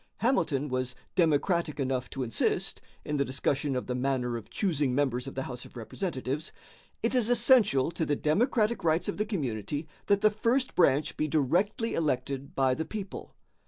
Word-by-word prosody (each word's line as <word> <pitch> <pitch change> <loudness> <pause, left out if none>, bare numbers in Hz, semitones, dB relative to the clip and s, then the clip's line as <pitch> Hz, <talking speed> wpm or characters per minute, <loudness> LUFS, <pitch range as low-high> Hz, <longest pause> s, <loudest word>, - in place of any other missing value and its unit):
Hamilton 150 - +1
was 130 -1 -2 0.2
democratic 170 -1 +2
enough 130 -2 -1
to 135 - -3
insist, 115 -2 0 0.2
in 150 - -1
the 140 - +3
discussion 135 +1 -1
of 125 - -2
the 125 - -2
manner 125 -1 0
of 115 - -7
choosing 150 -10 0
members 130 -2 0
of 135 - -7
the 135 - -2
House 125 -2 -6
of - - -13
Representatives, 140 - -4 0.5
"It - - +1
is 245 -3 +3
essential 220 - +4
to 165 - -2
the 145 -2 +1
democratic 215 - +1
rights 160 +1 +2
of - - -2
the 210 - 0
community 145 - -3 0.2
that 200 -1 +3
the 215 0 +5
first 235 +5 +1
branch 150 -3 +3
be 155 - 0
directly 175 - +1
elected 140 -2 -2
by 135 -1 +3
the 160 - -2
people." 205 -3 -7
150 Hz, 175 wpm, -29 LUFS, 130-190 Hz, 0.5 s, the